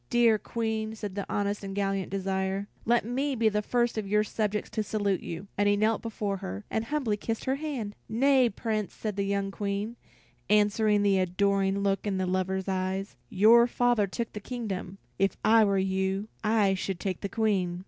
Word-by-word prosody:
"Dear 235 Hz, -3 st, +4 dB
Queen," 220 Hz, -1 st, -3 dB
said 205 Hz, -3 st, -5 dB
the 200 Hz, 0 st, -4 dB
honest 205 Hz, 0 st, -1 dB
and 195 Hz, 0 st, -5 dB
gallant 195 Hz, -1 st, -1 dB
Desire, 195 Hz, +1 st, -2 dB, 0.2 s
"let 235 Hz, 0 st, +3 dB
me 265 Hz, +4 st, -1 dB
be 225 Hz, -2 st, +3 dB
the 210 Hz, 0 st, 0 dB
first 240 Hz, +1 st, 0 dB
of 205 Hz, -, -4 dB
your 210 Hz, +1 st, +3 dB
subjects 210 Hz, -1 st, -2 dB
to 220 Hz, -, -1 dB
salute 205 Hz, -2 st, -1 dB
you." 170 Hz, +3 st, -6 dB
And 205 Hz, 0 st, +4 dB
he 205 Hz, -, +3 dB
knelt 215 Hz, +1 st, +2 dB
before 210 Hz, -3 st, -3 dB
her, 95 Hz, -, -6 dB
and 220 Hz, -, -1 dB
humbly 255 Hz, -7 st, -1 dB
kissed 225 Hz, +2 st, -4 dB
her 265 Hz, +1 st, 0 dB
hand. 275 Hz, -9 st, -4 dB, 0.2 s
"Nay, 260 Hz, +1 st, +4 dB
Prince," 215 Hz, -1 st, -3 dB
said 215 Hz, -3 st, -4 dB
the 200 Hz, -, -1 dB
young 200 Hz, 0 st, -1 dB
Queen, 205 Hz, +3 st, -3 dB, 0.5 s
answering 210 Hz, 0 st, +3 dB
the 195 Hz, -2 st, +3 dB
adoring 195 Hz, +2 st, +1 dB
look 195 Hz, +1 st, 0 dB
in 190 Hz, -2 st, 0 dB
her 185 Hz, -, 0 dB
lover's 185 Hz, +1 st, -1 dB
eyes, 190 Hz, +1 st, -2 dB
"your 230 Hz, +4 st, +6 dB
father 240 Hz, -4 st, +2 dB
took 230 Hz, +4 st, -4 dB
the 210 Hz, -, -5 dB
kingdom; 200 Hz, -5 st, -5 dB, 0.2 s
if 195 Hz, -, +1 dB
I 220 Hz, +1 st, +6 dB
were 200 Hz, -2 st, +2 dB
you, 190 Hz, +2 st, -1 dB
I 210 Hz, -3 st, +3 dB
should 190 Hz, -1 st, -3 dB
take 190 Hz, -3 st, -3 dB
the 200 Hz, -, -3 dB
Queen." 195 Hz, -6 st, 0 dB
205 Hz, 190 wpm, -28 LUFS, 195-220 Hz, 0.5 s, your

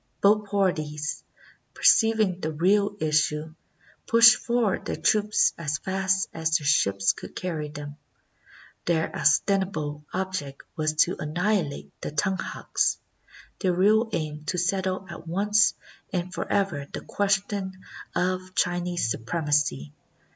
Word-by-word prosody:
Both 210 Hz, 0 st, +3 dB
parties, 155 Hz, -7 st, -1 dB, 0.5 s
perceiving 220 Hz, -5 st, +4 dB
the 155 Hz, -3 st, -3 dB
real 200 Hz, +6 st, +2 dB
is 155 Hz, -1 st, +3 dB
sue, 155 Hz, +1 st, -4 dB, 0.5 s
pushed 230 Hz, +1 st, +8 dB
forward 235 Hz, -5 st, 0 dB
their -, -, -2 dB
troops 210 Hz, 0 st, +2 dB
as 155 Hz, -2 st, -1 dB
fast 190 Hz, 0 st, 0 dB
as 160 Hz, -1 st, +1 dB
their 145 Hz, -, -9 dB
ships 100 Hz, -9 st, +3 dB
could -, -, -11 dB
carry 165 Hz, -5 st, -3 dB
them. 145 Hz, 0 st, -8 dB, 0.9 s
Their 160 Hz, -2 st, 0 dB
ostensible 155 Hz, -1 st, +1 dB
object 185 Hz, -7 st, -4 dB
was 155 Hz, -1 st, 0 dB
to 180 Hz, -, -5 dB
anni 150 Hz, 0 st, -5 dB
hilate 180 Hz, -6 st, -1 dB
the -, -, -4 dB
Tunghaks, 185 Hz, +6 st, -1 dB, 0.6 s
their 185 Hz, -3 st, +1 dB
real 215 Hz, +5 st, +3 dB
aim 155 Hz, -5 st, -3 dB
to 180 Hz, -, -2 dB
settle 185 Hz, +1 st, -1 dB
at 170 Hz, -2 st, -10 dB
once 205 Hz, +4 st, +3 dB, 0.4 s
and 180 Hz, -1 st, -3 dB
forever 190 Hz, -9 st, -1 dB
the -, -, -5 dB
question 195 Hz, -1 st, -1 dB, 0.4 s
of 185 Hz, +1 st, -1 dB
Chinese 175 Hz, -5 st, 0 dB
supremacy. 145 Hz, -, -1 dB
180 Hz, 125 wpm, -26 LUFS, 150-195 Hz, 0.9 s, pushed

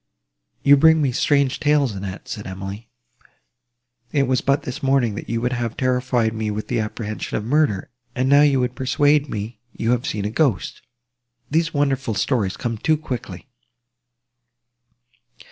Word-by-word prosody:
"You 145 Hz, 0 st, +7 dB
bring 160 Hz, +2 st, +6 dB
me 140 Hz, -4 st, +1 dB
strange 140 Hz, +1 st, +1 dB
tales, 150 Hz, -4 st, +2 dB
Annette," 95 Hz, -1 st, -7 dB
said 105 Hz, -3 st, -6 dB
Emily: 95 Hz, +4 st, -7 dB, 1.2 s
"it 140 Hz, -2 st, +2 dB
was 130 Hz, -1 st, +1 dB
but 140 Hz, +1 st, +1 dB
this 125 Hz, +4 st, -6 dB
morning, 135 Hz, -5 st, +2 dB
that 105 Hz, -, -7 dB
you 115 Hz, -, 0 dB
would 125 Hz, +1 st, 0 dB
have 120 Hz, -2 st, -3 dB
terrified 125 Hz, -3 st, +1 dB
me 110 Hz, -1 st, -2 dB
with 105 Hz, +1 st, -4 dB
the 120 Hz, -, 0 dB
apprehension 110 Hz, 0 st, -4 dB
of 105 Hz, -, -4 dB
murder; 125 Hz, -7 st, +1 dB, 0.2 s
and 130 Hz, +1 st, 0 dB
now 140 Hz, +1 st, +6 dB
you 140 Hz, -3 st, +4 dB
would 125 Hz, 0 st, -1 dB
persuade 145 Hz, +2 st, +2 dB
me, 105 Hz, +1 st, -5 dB, 0.2 s
you 115 Hz, +1 st, 0 dB
have 125 Hz, 0 st, 0 dB
seen 105 Hz, -2 st, -2 dB
a 105 Hz, -, -2 dB
ghost! 125 Hz, -, 0 dB, 0.7 s
These 165 Hz, +2 st, +1 dB
wonderful 135 Hz, -5 st, 0 dB
stories 100 Hz, -4 st, 0 dB
come 115 Hz, -3 st, -3 dB
too 155 Hz, +5 st, +2 dB
quickly." 125 Hz, -5 st, -6 dB
125 Hz, 160 wpm, -22 LUFS, 110-140 Hz, 1.2 s, You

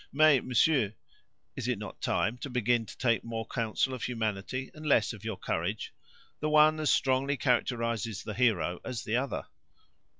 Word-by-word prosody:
Mais, 145 Hz, -2 st, +5 dB
monsieur, 125 Hz, -4 st, +2 dB, 0.6 s
is -, -, -4 dB
it -, -, 0 dB
not -, -, -8 dB
time 110 Hz, +4 st, 0 dB
to 130 Hz, +3 st, -7 dB
begin 120 Hz, -2 st, +1 dB
to -, -, -11 dB
take 115 Hz, -3 st, +1 dB
more 115 Hz, -1 st, -4 dB
counsel 115 Hz, +3 st, -1 dB
of 130 Hz, -, -6 dB
humanity, 115 Hz, +2 st, -3 dB
and 155 Hz, -, -11 dB
less 120 Hz, -8 st, +3 dB
of 110 Hz, -2 st, -11 dB
your 110 Hz, -3 st, -4 dB
courage? -, -, -3 dB, 0.5 s
The 155 Hz, -, -1 dB
one 155 Hz, +1 st, +5 dB
as 155 Hz, -2 st, +1 dB
strongly 135 Hz, +2 st, +2 dB
characterizes 115 Hz, -4 st, 0 dB
the 105 Hz, -, -5 dB
hero 95 Hz, -7 st, +1 dB
as 120 Hz, -3 st, -4 dB
the 115 Hz, +3 st, 0 dB
other." 135 Hz, +2 st, -2 dB
120 Hz, 170 wpm, -30 LUFS, 110-135 Hz, 0.6 s, Mais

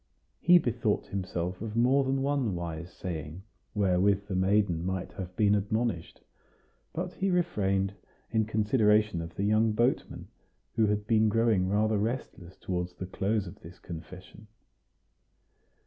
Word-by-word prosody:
He 175 Hz, +1 st, +7 dB
bethought 120 Hz, -8 st, 0 dB
himself 90 Hz, -2 st, -4 dB
of 110 Hz, -1 st, -5 dB
more 130 Hz, +4 st, +4 dB
than 135 Hz, 0 st, 0 dB
one 135 Hz, -8 st, 0 dB
wise 85 Hz, 0 st, -5 dB
saying, 85 Hz, 0 st, -6 dB, 0.3 s
wherewith 100 Hz, 0 st, +2 dB
the 100 Hz, -, -5 dB
maiden 95 Hz, -3 st, +2 dB
might 95 Hz, 0 st, -3 dB
have 90 Hz, -1 st, -7 dB
been 105 Hz, 0 st, +3 dB
admonished; 105 Hz, -2 st, -1 dB, 0.7 s
but 180 Hz, +2 st, -4 dB
he 195 Hz, -, -1 dB
refrained, 100 Hz, -, +1 dB, 0.4 s
in 110 Hz, -1 st, +2 dB
consideration 105 Hz, -3 st, +2 dB
of 85 Hz, 0 st, -8 dB
the 100 Hz, -, -2 dB
young 110 Hz, +1 st, +3 dB
boatman, 120 Hz, +4 st, 0 dB, 0.5 s
who 110 Hz, -2 st, +3 dB
had 105 Hz, 0 st, 0 dB
been 110 Hz, 0 st, +3 dB
growing 110 Hz, -4 st, +2 dB
rather 105 Hz, +1 st, +2 dB
restless 105 Hz, -5 st, -4 dB
toward 90 Hz, -1 st, -2 dB
the 95 Hz, -, -4 dB
close 100 Hz, +3 st, -1 dB
of 85 Hz, -, -10 dB
this 85 Hz, +2 st, -12 dB
confession. 90 Hz, +5 st, -10 dB
105 Hz, 140 wpm, -29 LUFS, 90-110 Hz, 0.7 s, He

